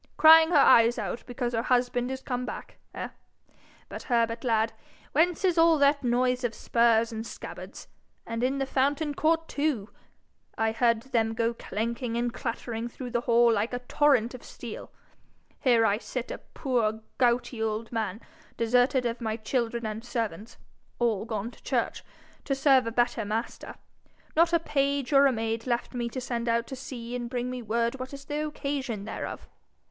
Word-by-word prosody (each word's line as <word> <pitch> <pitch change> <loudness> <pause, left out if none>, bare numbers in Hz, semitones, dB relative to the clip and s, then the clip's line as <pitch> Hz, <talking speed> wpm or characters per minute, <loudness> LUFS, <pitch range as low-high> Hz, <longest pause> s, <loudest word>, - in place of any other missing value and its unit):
Crying 320 0 +8
her 350 - +1
eyes 235 -3 +6
out - - -4
because 245 -1 -3
her 225 - +1
husband 245 0 +1
is 265 0 -5
come 250 -1 -2
back, - - -7 0.2
eh? - - -4 0.8
But, - - -7
Herbert, 230 -2 0
lad, 225 -2 +1 0.4
whence 350 +4 +2
is 355 -3 +3
all 330 -1 +6
that 285 0 +3
noise 250 +1 +1
of 240 -2 -1
spurs 230 -1 +2
and 220 0 -4
scabbards - - -9 0.4
and 230 0 -4
in 265 +2 +1
the 270 - 0
fountain 285 +3 0
court, 325 +2 +1
too? 280 -8 -1 0.7
I 225 0 +1
heard 230 0 +2
them 225 -4 0
go 230 +1 +1
clanking 230 +2 -3
and 240 0 -1
clattering 230 -1 -4
through 245 +1 -8
the 240 -1 0
hall 235 -1 +4
like 220 +3 -1
a - - 0
torrent 265 -5 +3
of 250 - -10
steel! 235 -3 -9 0.7
Here 235 -4 +4
I 205 0 +2
sit, 250 0 -5
a - - -5
poor 225 -5 -1 0.2
gouty 240 -1 +1
old 220 0 -2
man, 220 -2 -3 0.4
deserted 245 +2 +2
of 235 +1 -2
my 220 -1 -2
children 235 0 -2
and 215 +1 -4
servants 230 -3 -4 0.4
all 225 -4 0
gone 220 0 -4
to - - -19
church - - -1 0.4
to 275 - 0
serve 270 -3 +4
a - - -1
better 240 -1 +1
Master 220 +4 -4 0.6
not 335 +1 +4
a 340 - +5
page 280 -3 0
or 275 0 +7
a - - +3
maid 225 0 -2
left 240 +1 -1
me 240 -1 -2
to 255 - -5
send 240 -2 -3
out 230 0 +1
to 265 - -7
see 245 -2 -7
and 240 -1 -4
bring 250 0 -2
me 250 -1 -5
word 235 +3 -1
what 260 +2 -6
is 280 0 -11
the 295 +1 -2
occasion 275 -8 -3
thereof! 220 - -6
240 Hz, 180 wpm, -27 LUFS, 230-265 Hz, 0.8 s, Crying